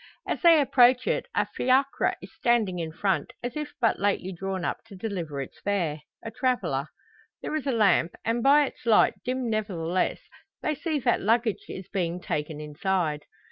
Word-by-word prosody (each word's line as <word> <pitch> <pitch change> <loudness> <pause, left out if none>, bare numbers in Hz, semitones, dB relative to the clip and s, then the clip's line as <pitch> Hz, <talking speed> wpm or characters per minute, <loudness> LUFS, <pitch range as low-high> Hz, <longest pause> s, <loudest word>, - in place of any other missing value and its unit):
As - - -2
they 335 -3 +7
approach 250 -2 +5
it - - 0
a - - +2
fiacre 265 +2 +1
is - - -11
standing 220 -7 +1
in 165 -1 -3
front, 190 +3 -1
as 245 0 -4
if 300 -1 -5
but 230 -3 +2
lately 195 -2 0
drawn 190 0 -4
up - - -3
to 215 -3 -12
deliver 180 -8 -4
its - - -14
fare 170 -7 -1 0.2
a 225 - -6
traveller. 205 - 0 0.6
There - - -3
is 300 -2 -3
a - - +2
lamp, 200 -7 +3
and 230 +1 0
by 285 +3 +6
its 255 - -9
light, 220 - +5
dim 255 0 -2
nevertheless, 185 -6 -1 0.4
they 305 - +1
see 310 +1 -2
that 240 -1 +2
luggage 225 +1 +1
is 185 - -7
being 180 -3 -2
taken 150 -3 -3
inside. 150 0 -1
205 Hz, 180 wpm, -27 LUFS, 175-250 Hz, 0.6 s, they